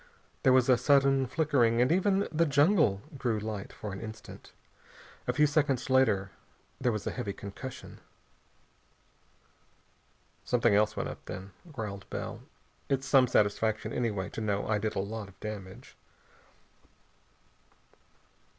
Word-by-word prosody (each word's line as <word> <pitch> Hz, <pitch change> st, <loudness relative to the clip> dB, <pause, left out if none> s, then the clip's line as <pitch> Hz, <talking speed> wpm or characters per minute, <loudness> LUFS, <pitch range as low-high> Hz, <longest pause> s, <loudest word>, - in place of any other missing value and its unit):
There 135 Hz, -, +4 dB
was 130 Hz, -1 st, +4 dB
a 130 Hz, -2 st, +5 dB
sudden 135 Hz, 0 st, +4 dB
flickering 130 Hz, -5 st, +2 dB
and 125 Hz, +4 st, +3 dB
even 195 Hz, +2 st, +2 dB
the 165 Hz, +1 st, +2 dB
jungle 145 Hz, -, +3 dB, 0.2 s
grew 120 Hz, -5 st, 0 dB
light 105 Hz, -1 st, -5 dB
for 105 Hz, -3 st, -7 dB
an 100 Hz, -, -7 dB
instant. 110 Hz, 0 st, -10 dB, 0.8 s
A -, -, +1 dB
few 150 Hz, -, +4 dB
seconds 140 Hz, -3 st, +1 dB
later 105 Hz, -8 st, +3 dB, 0.5 s
there 125 Hz, -, +1 dB
was 105 Hz, -2 st, -4 dB
a -, -, -1 dB
heavy 110 Hz, -6 st, -4 dB
concussion. 105 Hz, +7 st, -9 dB, 2.4 s
"Something 120 Hz, -3 st, +2 dB
else 105 Hz, +1 st, +3 dB
went -, -, -1 dB
up -, -, -9 dB
then," 95 Hz, +2 st, -7 dB, 0.2 s
growled 105 Hz, -7 st, -6 dB
Bell. -, -, -5 dB, 0.5 s
"It's 135 Hz, -1 st, 0 dB
some 130 Hz, -3 st, +5 dB
satisfaction, 110 Hz, -1 st, +1 dB
anyway, 105 Hz, -6 st, -1 dB
to -, -, -6 dB
know 100 Hz, -2 st, -1 dB
I 110 Hz, -1 st, +1 dB
did 110 Hz, +1 st, -2 dB
a -, -, 0 dB
lot 105 Hz, +1 st, -4 dB
of 95 Hz, -, -20 dB
damage." 100 Hz, -3 st, -8 dB
115 Hz, 135 wpm, -30 LUFS, 105-135 Hz, 2.4 s, a